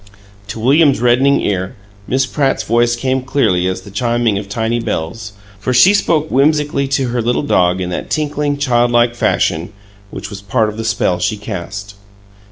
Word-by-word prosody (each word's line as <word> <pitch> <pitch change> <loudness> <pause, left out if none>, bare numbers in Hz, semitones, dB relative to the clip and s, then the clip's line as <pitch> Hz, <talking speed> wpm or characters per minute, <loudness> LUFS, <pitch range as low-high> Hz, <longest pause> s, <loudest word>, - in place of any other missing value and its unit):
To 105 - -6
William's 140 +4 +3
reddening 125 +4 +3
ear 95 +3 -2 0.3
Miss 130 +1 +1
Pratt's 135 +1 0
voice 120 +1 +2
came 130 +2 -1
clearly 110 -9 +1
as 95 0 -3
the 100 - -13
chiming 115 -1 0
of 100 -1 -9
tiny 115 +2 -1
bells, 105 +1 -4 0.3
for 125 +4 -1
she 190 +11 +6
spoke 160 -6 +1
whimsically 145 0 +1
to 135 -2 0
her 120 0 -1
little 120 +5 0
dog 90 -9 +2
in 90 -1 -3
that - - -5
tinkling 150 -1 -1
childlike 120 -3 +2
fashion 85 -7 0 0.4
which 100 - -8
was 100 -1 -8
part 105 +2 0
of 105 - -8
the 115 - -4
spell 110 -5 0
she 105 +4 -1
cast. 100 0 -7
120 Hz, 175 wpm, -16 LUFS, 100-135 Hz, 0.4 s, she